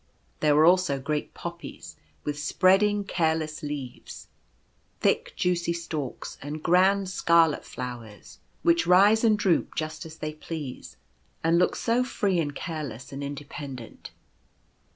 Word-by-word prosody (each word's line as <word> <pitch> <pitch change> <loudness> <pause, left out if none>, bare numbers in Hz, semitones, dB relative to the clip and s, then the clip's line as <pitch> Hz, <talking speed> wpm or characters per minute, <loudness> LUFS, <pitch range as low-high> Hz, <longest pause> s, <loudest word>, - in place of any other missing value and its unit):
There 150 -1 +3
were 155 +1 +6
also 175 -5 +4
great 150 +2 -3
Poppies, - - -8 0.3
with 145 0 -3
spreading, 200 +6 +3
careless 160 -4 -1
leaves, 145 -5 -7 0.7
thick - - +1
juicy 175 -1 0
stalks, 160 -6 -5
and 150 +2 -6
grand 190 +3 +4
scarlet 170 -4 +3
flowers, 120 -4 -8 0.2
which 170 0 +3
A - - -1
New 180 - +8
Brother. 195 +2 +7
1 220 - +5
65 220 - -2
rise - - -8
and 215 - +3
droop 190 -4 +1
just 155 0 -4
as 160 0 -12
they 155 0 -4
please, 150 - -7 0.5
and 165 +1 +4
look 180 - +2
so 240 +2 +1
free 200 -7 0
and 145 -3 -2
careless 145 -8 -6
and 140 +1 -5
independent. 140 -3 -7
160 Hz, 150 wpm, -26 LUFS, 145-180 Hz, 0.7 s, New